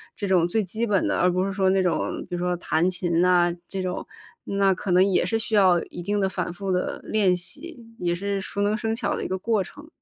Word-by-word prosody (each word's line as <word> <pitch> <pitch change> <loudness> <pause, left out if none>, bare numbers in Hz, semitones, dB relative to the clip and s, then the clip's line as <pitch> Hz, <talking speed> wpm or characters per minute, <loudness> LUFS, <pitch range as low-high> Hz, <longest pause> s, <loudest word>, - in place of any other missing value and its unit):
这 205 - -3
种 180 -3 +3
最 215 +5 0
基 220 +5 -2
本 200 -3 +2
的， - - 0
而 180 +1 +4
不 185 +1 0
是 195 - -3
说 190 -1 +2
那 190 0 +3
种 180 -3 -1
比 180 - -4
如 - - -3
说 180 0 0
弹 165 +1 +1
琴 175 -2 0
啊 175 -1 +4 0.2
这 190 -1 -3
种， 180 -1 -4 0.4
那 195 -1 +2
可 190 +2 -6
能 180 +1 +5
也 195 -2 +2
是 225 - 0
需 225 0 -3
要 185 -4 +5
一 175 - -9
定 205 +4 -1
的 195 - +2
反 180 -2 -3
复 190 +2 -4
地 180 0 -1
练 200 -4 +2
习， 285 - -6 0.2
也 175 -1 0
是 200 +2 -2
熟 200 +1 -4
能 205 +1 +2
生 225 0 -2
巧 240 - -1
的 - - -4
一 - - -2
个 190 - -2
过 215 +1 0
程。 290 +10 -13
190 Hz, 275 characters per minute, -24 LUFS, 180-205 Hz, 0.4 s, 能